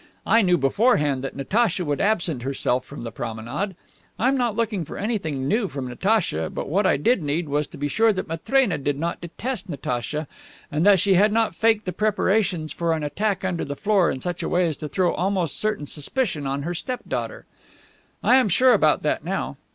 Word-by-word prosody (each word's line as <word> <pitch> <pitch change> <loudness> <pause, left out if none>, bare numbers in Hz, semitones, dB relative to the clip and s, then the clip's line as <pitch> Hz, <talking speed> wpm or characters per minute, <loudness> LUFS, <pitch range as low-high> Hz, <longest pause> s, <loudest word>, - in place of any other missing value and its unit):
I 230 - +5
knew 180 -3 +3
beforehand 145 - +2
that 135 - -5
Natacha 185 - 0
would 145 -1 -1
absent 175 - 0
herself 130 -1 -1
during 145 - -8
the 115 - -5
promenade. 120 - -4 0.4
I'm 255 +6 +2
not 240 -5 0
looking 220 -5 -1
for - - -8
anything 160 - -2
new 215 +6 +1
from 135 -6 -5
Natacha, 125 - 0
but - - -5
what 190 +6 +2
I - - +3
did 225 - +2
need 155 +3 -1
was 145 0 0
to - - -12
be 145 - -1
sure 225 +10 +3
that 185 -2 -3
Matrena 180 - +1
didn't 145 +4 -2
detest 215 +6 -5
Natacha, 140 +1 -3 0.4
and 150 +2 0
that 200 -2 +7
she 195 +1 +3
had 205 +3 +4
not 225 +1 +1
faked 225 -2 +2
the 185 - -3
preparations 195 -5 0
for 170 -1 0
an 160 -1 -2
attack 195 +6 -1
under 180 -3 -1
the 140 - -4
floor 200 0 +2
in 130 - -3
such 175 -1 -3
a - - -2
way 180 0 +2
as 160 -4 -2
to 150 - -6
throw 180 +4 +1
almost 185 -4 -1
certain 215 -8 -1
suspicion 150 - -2
on 140 +1 -2
her 175 +3 -2
step 250 +8 -4
daughter. - - -4 0.8
I 255 - +6
am 255 -6 +3
sure 255 +8 +5
about - - +3
that - - 0
now. - - -3
175 Hz, 205 wpm, -23 LUFS, 145-215 Hz, 0.8 s, that